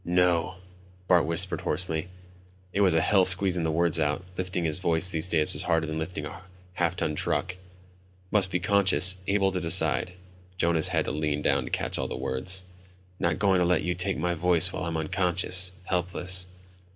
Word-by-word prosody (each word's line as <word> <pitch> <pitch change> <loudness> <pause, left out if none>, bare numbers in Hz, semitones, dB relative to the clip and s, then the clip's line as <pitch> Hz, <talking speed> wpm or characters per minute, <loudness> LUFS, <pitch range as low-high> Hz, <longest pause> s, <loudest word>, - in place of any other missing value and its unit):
"No," 90 0 +1 0.5
Bart 85 -4 +3
whispered 85 +3 -2
hoarsely. 80 -2 -2 0.7
It 100 - 0
was 95 -4 +3
hell 95 +4 +3
squeezing 95 -1 +6
the 80 - -1
words 85 +1 +1
out. 75 +4 -1
Lifting 90 -1 -3
his 80 +1 -2
voice 85 -1 +1
these 80 0 -1
days 80 -3 +3
was - - 0
harder 80 -1 0
than 80 0 -4
lifting 80 -1 -5
a - - -9 0.3
half 90 0 -1
ton 75 - -2
truck. 90 +4 -2 0.8
"Must 100 -3 +3
be 90 - -1
conscious, 95 -1 +3
able 100 -1 +1
to 90 - -3
decide." 80 -1 0 0.4
Jonas 85 -2 +2
had - - 0
to - - -3
lean 75 -1 -2
down 70 -2 +1
to - - -7
catch - - -2
all - - -2
the - - -6
words. 90 +9 -2 0.6
"Not 85 -2 0
going 95 -3 +2
to - - +2
let 90 +1 +1
you 90 - -1
take 95 +2 -1
my 85 +3 -1
voice 90 +1 +3
while 90 - -4
I'm 85 -1 -3
unconscious... 90 +2 0
helpless 90 0 -2
90 Hz, 185 wpm, -26 LUFS, 80-95 Hz, 0.8 s, squeezing